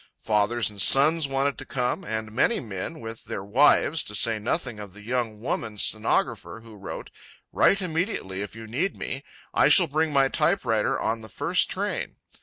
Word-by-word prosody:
Fathers 110 +1 +1
and 100 -2 -2
sons 150 - +5
wanted 135 +1 -1
to - - -5
come, 125 +8 -1
and 110 -6 -4
many 130 - +2
men 110 - -6
with 115 0 -8
their 95 - -5
wives, 145 +8 +3
to 105 - -5
say 115 +1 +2
nothing 110 +1 -2
of 100 -3 -9
the 105 +1 -14
young 115 -2 -2
woman 110 -2 -3
stenographer 110 +1 0
who 115 -1 -14
wrote: 100 -1 -8 0.4
"Write 200 -1 +3
immediately 160 - -2
if 105 +1 -6
you 115 0 -9
need 145 - -2
me. 135 +1 -5 0.3
I - - +4
shall - - +6
bring 155 +2 0
my 135 -2 +4
typewriter 150 - +1
on 110 +1 -1
the 110 - -11
first - - +1
train." - - -3
115 Hz, 180 wpm, -25 LUFS, 105-140 Hz, 0.4 s, shall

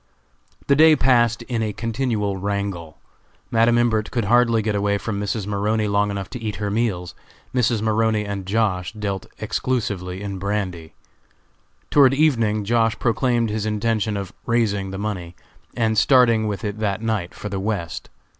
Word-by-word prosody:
The 140 - +4
day 155 +1 +7
passed 120 -3 +3
in 120 -1 -3
a 110 -1 -1
continual 115 -3 -1
wrangle. 100 -5 -4 0.5
Madam 115 0 +4
Imbert 110 -3 +1
could 115 -4 -1
hardly 115 0 +3
get 110 0 0
away 100 0 +1
from 100 -1 -4
Mrs. 105 0 -2
Maroney 105 +1 0
long 100 0 +1
enough 100 -1 -4
to 125 - -6
eat 110 -2 -3
her 105 0 -3
meals. 100 -6 -1 0.4
Mrs. 120 -3 +1
Maroney 110 -1 +1
and 100 -2 -5
Josh. 100 -3 0
dealt 100 -3 -4
exclusively 100 -7 -2
in 100 -2 -5
brandy. 95 -5 -3 1.0
Toward 135 -2 +6
evening 115 -8 +2
Josh. 115 0 +2
proclaimed 120 -1 +1
his 110 0 -2
intention 110 0 0
of 100 -1 -6
"raising" 105 -5 +1
the 95 - -6
money, 95 -4 -4 0.4
and 110 -2 +1
starting 115 -4 +4
with 105 +1 -4
it 105 +1 -4
that 105 0 -1
night 110 -6 -2
for 105 - -6
the 100 -1 -3
West. 100 -4 -3
105 Hz, 160 wpm, -22 LUFS, 100-115 Hz, 1.0 s, day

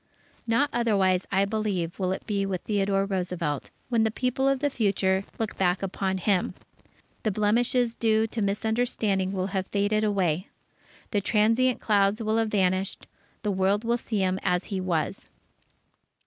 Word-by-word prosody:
Not 265 +6 +2
otherwise, 195 -6 +2
I 195 +1 +3
believe, 200 -5 -2
will 185 -1 0
it 190 - -4
be 200 -2 -1
with 190 -2 -2
Theodore 195 -2 +1
Roosevelt, 180 -7 -2 0.2
when 235 -3 +2
the 220 - +3
people 255 +4 0
of 275 - +2
the 290 +2 0
future 195 -4 +1
look 220 -1 -3
back 180 0 +1
upon 190 0 -1
him. 185 0 0 0.7
The 215 - 0
blemishes 230 +4 +2
due 220 -1 +2
to 225 0 -3
misunderstanding 210 -2 0
will 190 0 -2
have 190 -1 -1
faded 205 +1 +1
away. 185 -4 0 0.6
The 205 - +1
transient 230 +5 +2
clouds 200 0 +2
will 220 0 0
have 225 -1 +1
vanished. 190 -1 0 0.4
The 210 - 0
world 195 +2 +1
will 235 +1 +1
see 215 -4 -2
him 185 0 +1
as 180 0 +1
he 190 - -1
was.... 170 -4 -2
200 Hz, 160 wpm, -26 LUFS, 190-220 Hz, 0.7 s, I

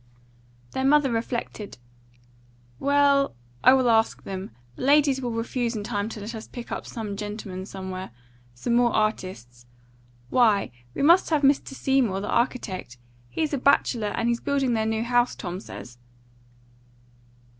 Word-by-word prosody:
Their 265 - -2
mother 280 -1 +4
reflected. 230 - -4 1.0
"Well, 280 - +3 0.3
I 255 - +8
will 260 -2 +3
ask 225 -1 +2
them. 190 -1 -5 0.3
The - - -10
ladies 280 -1 +4
will 245 - -2
refuse 235 +1 -2
in 210 - -3
time 205 +1 -2
to 220 - -7
let 210 +3 -6
us 220 -1 -7
pick 240 -1 -9
up - - -4
some 215 -3 -5
gentlemen 200 -2 -6
somewhere; 190 -1 -6 0.5
some 180 - -2
more 240 0 +4
artists. 185 - -2 0.6
Why! 215 - +3 0.2
we - - -1
must 340 +5 +6
have 305 -3 +1
Mr. 275 0 +2
Seymour, 260 -8 +1
the 205 - -5
architect; 200 - -1 0.3
he's 310 - -2
a 280 - 0
bachelor, 245 -4 +2
and 230 +3 -1
he's 235 0 +1
building 275 -3 +1
their 220 0 0
house, 245 +1 +2
Tom 180 -2 -5
says." 125 -10 -10
230 Hz, 145 wpm, -25 LUFS, 205-265 Hz, 1.0 s, I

